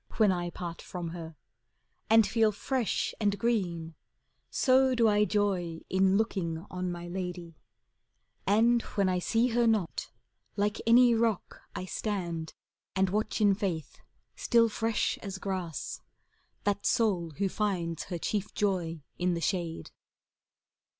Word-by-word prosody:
When 215 -3 +5
I 175 -1 -1
part 170 -1 -6
from 175 -2 -5
her; 165 -1 -7 0.7
and 225 0 +7
feel 220 -1 +3
fresh 245 +3 -1
and 205 -1 +2
green, 175 -9 -1 0.6
So 260 0 +4
do 230 -2 +4
I 210 0 +4
joy, 190 -6 0
in 190 +1 +4
looking 175 -6 -1
on 180 0 -2
my 175 0 -6
lady: 175 -2 -5 0.9
And 230 +4 +4 0.2
when 200 -1 +3
I 180 -1 +1
sec 230 +6 +1
her 235 0 +3
not, 210 - 0 0.5
like 205 +2 0
any 240 +1 +7
rock 225 -3 0
I 185 - -4
stand, 175 -5 -3 0.4
and 190 -1 +2
watch 215 +2 -1
in 205 -1 +5
faith, 180 - -3 0.4
still 230 -1 +3
fresh 225 +1 0
as 195 -2 -6
grass, 185 -6 -4 0.6
That 205 0 0
soul 185 -9 +1
who 200 - +1
finds 180 -5 -2
her 180 - -4
chief 205 +4 -3
joy 175 -6 -1 0.2
in 180 0 +1
the - - -2
shade. 170 -3 -2
195 Hz, 135 wpm, -30 LUFS, 175-220 Hz, 0.9 s, and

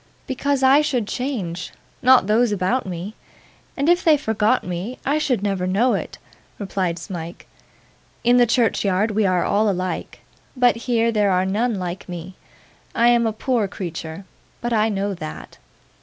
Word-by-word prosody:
'Because 275 0 -1
I 270 +3 +6
should 260 -8 -1
change; 200 -11 -4 0.3
not 255 -4 +6
those 220 +3 +2
about 205 +5 0
me. 180 +3 -5 0.6
And 280 +1 0
if 350 +1 +3
they 315 -2 +5
forgot 220 -2 +1
me, 180 +8 -5
I 290 +3 +1
should 250 -9 0
never 195 -3 -1
know 215 +7 +2
it,' - - -4 0.4
replied 190 -4 -2
Smike. 170 -1 -7 0.8
'In 240 +1 +4
the 245 -1 +5
churchyard 215 -3 +1
we 210 -1 +1
are 180 -1 +2
all 210 +1 +2
alike, 185 -1 -3 0.4
but 250 -1 +4
here 230 0 0
there 210 -2 +2
are 185 0 +2
none 220 +5 0
like 180 -1 -5
me. 175 +1 -7 0.6
I 235 +1 +4
am 235 -1 +3
a - - 0
poor 225 0 0
creature, 175 -2 -7 0.3
but 240 0 -2
I 220 0 +2
know 200 -1 -1
that. 75 - -8
210 Hz, 160 wpm, -21 LUFS, 185-245 Hz, 0.8 s, I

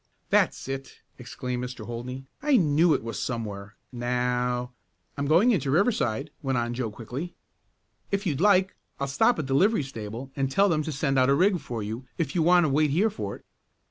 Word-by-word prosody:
"That's - - +2
it!" 135 0 -6 0.2
exclaimed 125 0 -4
Mr. 125 -3 -6
Holdney. 125 +3 -6 0.2
"I 285 -2 +4
knew 160 -2 +4
it - - -3
was 115 -2 -4
somewhere. 105 -4 -5 0.2
Now 125 0 -1 0.2
" - - -45
"I'm 140 0 -2
going 175 - +5
into 145 - 0
Riverside," 150 - +1
went 135 -3 -1
on 120 0 -1
Joe 120 -2 -2
quickly. 125 +10 -7 0.7
"If 200 +1 -1
you 160 -6 0
like 190 +3 +3 0.2
I'll 140 - 0
stop 140 - +2
at 155 - -2
the 135 - -2
livery 195 +4 +3
stable 115 0 -7
and 135 -1 0
tell 195 +9 +3
them 155 -3 +2
to 155 - -4
send 135 -1 +1
out 130 +1 +4
a 140 - +5
rig 185 +3 +3
for 120 -6 -5
you 115 +5 -6
if 165 - -2
you 175 - +1
want 175 +2 +5
to 155 - +2
wait 150 +2 +3
here 195 +10 +2
for 100 - -5
it." - - -17
135 Hz, 205 wpm, -26 LUFS, 125-165 Hz, 0.7 s, going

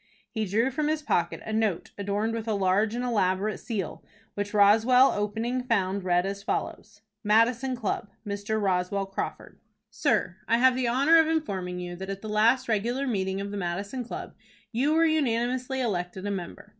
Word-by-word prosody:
He 220 -1 -2
drew 225 +7 +1
from 295 +3 -1
his 310 0 -1
pocket 170 - 0
a 220 - -4
note 215 -5 0
adorned 205 +3 -1
with 230 0 -4
a 220 - +1
large 200 +3 +2
and 245 - -2
elaborate 205 -3 0
seal, 215 -7 -4 0.3
which 205 0 -3
Roswell, 225 +6 +5
opening 225 +5 -2
found 200 -5 0
read 180 0 +2
as 200 0 -4
follows: 205 +1 -4 0.2
"MADISON 230 +5 +3
CLUB. 210 -3 -3 0.2
"Mr. 205 +1 -2
ROSWELL 195 0 0
CRAWFORD. 195 0 -6 0.3
"Sir: - - 0
I 230 - +3
have 255 +1 +5
the 255 -1 0
honor 280 +7 +5
of 320 - +4
informing 195 - -2
you 175 0 -5
that 190 +1 -7
at 195 +1 -5
the 215 - -5
last 230 +5 +3
regular 235 +5 0
meeting 190 -6 -1
of 200 0 -4
the 205 - -4
Madison 200 +7 -3
Club 235 - -7 0.4
you 260 +6 +1
were 325 +1 +4
unanimously 255 -3 0
elected 185 -4 -2
a 205 - -1
member. 190 +1 -6
215 Hz, 180 wpm, -27 LUFS, 195-250 Hz, 0.4 s, Roswell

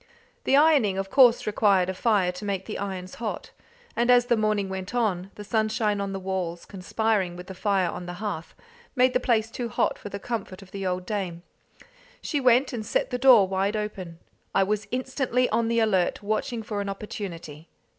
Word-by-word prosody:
The 270 - +4
ironing 285 -11 +4
of 195 0 -3
course 245 -3 +5
required 200 -3 +3
a 190 - -2
fire 195 -2 +2
to 180 +3 -9
make 195 -2 -2
the - - -5
irons 190 -2 -5
hot, 225 - -4 0.4
and 240 +1 +1
as 245 -1 +6
the 240 - +3
morning 215 -2 0
went 190 +3 -5
on, 195 -6 0
the 210 - -8
sunshine 215 -1 0
on 200 0 -3
the 195 - -4
walls, 185 -3 -3
conspiring 195 -1 -1
with 180 0 -9
the 190 - -8
fire 190 -1 +1
on 180 +1 -6
the 175 - -5
hearth, 185 -4 -5 0.4
made 255 0 +4
the 250 - +3
place 230 -3 +1
too 240 -1 -4
hot - - 0
for - - -8
the 200 - -5
comfort 200 -3 -5
of 190 - -18
the 195 -1 -4
old 180 0 -2
dame. 180 -4 -4 0.8
She 295 - -2
went 255 0 +3
and 225 -3 -3
set 215 - -1
the 250 - -2
door 245 -7 +7
wide 195 +2 0
open. 195 -5 -5 0.4
I 195 - +5
was 205 +1 -1
instantly 255 0 0
on 225 +1 +1
the 230 0 0
alert, 200 -3 +1
watching 215 +2 -2
for 210 -1 -3
an 200 - -4
opportunity. 175 -6 -7
205 Hz, 200 wpm, -26 LUFS, 190-230 Hz, 0.8 s, door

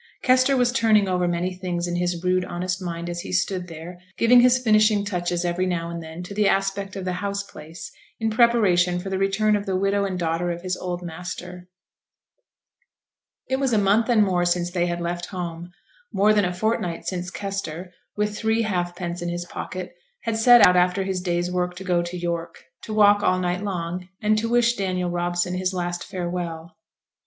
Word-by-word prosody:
Kester 255 +1 +4
was 245 -1 +3
turning 220 -5 +3
over 180 -1 +1
many 175 +2 -1
things 180 -1 -3
in 175 0 -3
his 175 -1 -1
rude 180 0 +2
honest 180 +1 -3
mind 170 -1 -4
as 175 0 -4
he - - -6
stood 180 0 -1
there, 170 +2 -9 0.2
giving 245 +1 +6
his 250 0 +5
finishing 215 -3 +3
touches 175 -2 -2
every 175 +2 0
now 170 -2 -2
and 170 0 -5
then 160 +2 -8
to 180 - -8
the 210 0 +2
aspect 195 0 -1
of 190 -1 -5
the 185 - -1
house 200 0 -2
place, 165 - -10 0.3
in 225 -1 0
preparation 210 -7 +3
for 195 +2 -5
the 190 - -1
return 205 +2 +2
of 205 -1 -3
the 190 - 0
widow 195 +1 +1
and 190 -2 -2
daughter 170 0 -1
of 175 0 -4
his 185 -1 -1
old 180 -1 -5
master. 180 +1 -7 1.8
It 265 - 0
was 265 -3 +1
a - - +4
month 205 +4 +3
and 225 -3 +5
more 180 -3 +1
since 175 0 0
they 175 -1 0
had 175 0 -2
left 175 +1 -3
home; 175 -2 -6 0.4
more 210 +2 +4
than 205 -2 +3
a 180 - -1
fortnight 180 -3 -2
since 180 -1 -3
Kester, 190 -3 -5 0.2
with 210 0 0
three 220 +1 +1
halfpence 175 -3 -3
in 175 - -2
his 175 0 -4
pocket, 185 +1 -6 0.3
had 230 - -2
set 240 +1 +7
out 180 - +5
after 180 +2 +2
his 190 -1 -2
day's 175 0 -1
work 180 0 -1
to 185 - -8
go 180 -2 +1
to 175 +1 -5
York 170 -1 -4 0.2
to - - -7
walk 205 -1 +5
all 185 -2 +2
night 180 0 -1
long, 180 -2 -4
and 215 0 +2
to 230 +1 -2
wish 240 0 +3
Daniel 185 -4 -2
Robson 175 +1 -1
his 185 +1 -1
last 175 -1 -3
farewell. 175 -3 -5
180 Hz, 200 wpm, -23 LUFS, 175-205 Hz, 1.8 s, set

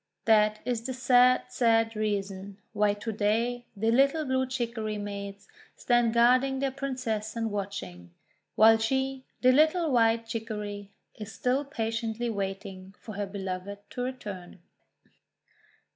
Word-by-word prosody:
That 215 -1 +4
is 245 -2 -1
the 260 - -4
sad, 250 0 +4
sad 225 -2 +2
reason 200 -2 -3 0.2
why 205 -1 +2
to 225 +2 -5
day 230 +4 0
the 225 +3 +1
little 275 +5 +3
Blue 260 -1 0
Chicory 230 -4 -3
maids 200 -1 -6 0.3
stand 240 -2 +2
guarding 255 +3 +4
their 270 0 -1
Princess 255 -6 -3
and 225 -1 -2
watching; 95 - -5 0.5
while 225 +1 +6
she, 265 +3 -1 0.2
the 255 - +6
little 315 +3 +3
White 230 -2 +3
Chicory, 210 -3 -5 0.2
is 215 0 -8
still 255 +6 0
patiently 230 -2 -3
waiting 195 -1 -5
for 215 - -9
her 205 0 -3
Beloved 195 0 -5
to 250 - -5
return. 210 -9 -6
225 Hz, 130 wpm, -28 LUFS, 205-250 Hz, 0.5 s, while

